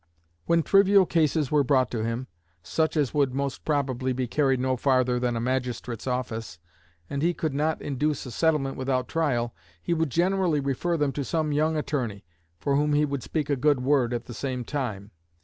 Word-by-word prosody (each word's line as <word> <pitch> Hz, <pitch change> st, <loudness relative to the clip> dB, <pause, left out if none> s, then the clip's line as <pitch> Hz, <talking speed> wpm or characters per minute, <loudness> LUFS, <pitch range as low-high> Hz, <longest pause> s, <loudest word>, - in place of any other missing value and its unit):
When 170 Hz, -1 st, +3 dB
trivial 195 Hz, +1 st, +5 dB
cases 155 Hz, -4 st, +1 dB
were 150 Hz, -1 st, +4 dB
brought 130 Hz, -2 st, +2 dB
to 115 Hz, -3 st, -2 dB
him, 115 Hz, +3 st, -2 dB, 0.4 s
such 160 Hz, 0 st, 0 dB
as 145 Hz, -4 st, +1 dB
would 140 Hz, -4 st, +1 dB
most 140 Hz, -1 st, -3 dB
probably 130 Hz, -4 st, 0 dB
be 125 Hz, 0 st, -1 dB
carried 135 Hz, +1 st, +1 dB
no 130 Hz, 0 st, +1 dB
farther 130 Hz, -1 st, +2 dB
than 120 Hz, -1 st, 0 dB
a -, -, -1 dB
magistrate's 125 Hz, -1 st, -3 dB
office, 115 Hz, -6 st, -3 dB, 0.5 s
and 140 Hz, -, -3 dB
he 170 Hz, +2 st, +1 dB
could 155 Hz, -3 st, -2 dB
not 155 Hz, +3 st, -1 dB
induce 145 Hz, +1 st, -1 dB
a 125 Hz, -, -7 dB
settlement 150 Hz, -2 st, +1 dB
without 130 Hz, -1 st, -1 dB
trial, 125 Hz, -8 st, 0 dB, 0.3 s
he 175 Hz, -, -1 dB
would 160 Hz, -2 st, 0 dB
generally 175 Hz, 0 st, +1 dB
refer 140 Hz, +5 st, -1 dB
them 145 Hz, -2 st, +1 dB
to 140 Hz, -, -3 dB
some 155 Hz, +2 st, -1 dB
young 155 Hz, +2 st, +1 dB
attorney, 125 Hz, -, -3 dB, 0.3 s
for 140 Hz, +11 st, 0 dB
whom 150 Hz, +1 st, +2 dB
he 150 Hz, +1 st, +3 dB
would 140 Hz, -2 st, -3 dB
speak 150 Hz, +1 st, -2 dB
a 145 Hz, -, +1 dB
good 140 Hz, 0 st, +2 dB
word 130 Hz, -3 st, +2 dB
at 120 Hz, -1 st, -3 dB
the 120 Hz, -, -8 dB
same 130 Hz, 0 st, -3 dB
time. 110 Hz, -7 st, -4 dB
140 Hz, 195 wpm, -26 LUFS, 125-150 Hz, 0.5 s, trivial